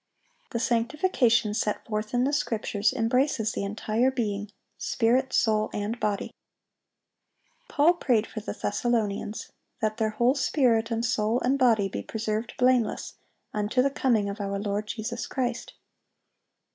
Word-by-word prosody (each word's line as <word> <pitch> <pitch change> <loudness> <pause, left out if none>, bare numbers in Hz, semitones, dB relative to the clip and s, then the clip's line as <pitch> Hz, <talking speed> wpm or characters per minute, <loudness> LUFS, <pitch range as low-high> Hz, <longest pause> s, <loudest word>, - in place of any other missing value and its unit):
The 235 - -3
sanctification 235 - +2
set 210 -1 -1
forth 215 -1 -3
in 245 - +3
the 280 +3 +1
Scriptures 215 -6 0
embraces 250 -1 +1
the - - -3
entire 215 +4 0
being,—spirit, 230 +2 -1
soul, 215 -2 +2
and 210 +3 -3
body. 205 -2 -2 1.3
Paul 310 +4 +4
prayed 245 -10 +1
for 220 - -7
the 215 - -5
Thessalonians, 210 -1 -2 0.3
that 215 0 -1
their 220 -2 +1
"whole 240 +4 +2
spirit 250 -5 +2
and 230 0 -1
soul 220 0 +1
and 270 +3 +1
body 225 -6 +4
be - - -5
preserved 220 +1 -3
blameless 250 -3 +2 0.4
unto 210 +4 +1
the 275 - +1
coming 235 -7 +1
of 200 +1 -5
our 200 0 -2
Lord 205 +1 -2
Jesus 230 +2 -4
Christ." 250 -2 -3
225 Hz, 135 wpm, -27 LUFS, 210-250 Hz, 1.3 s, Paul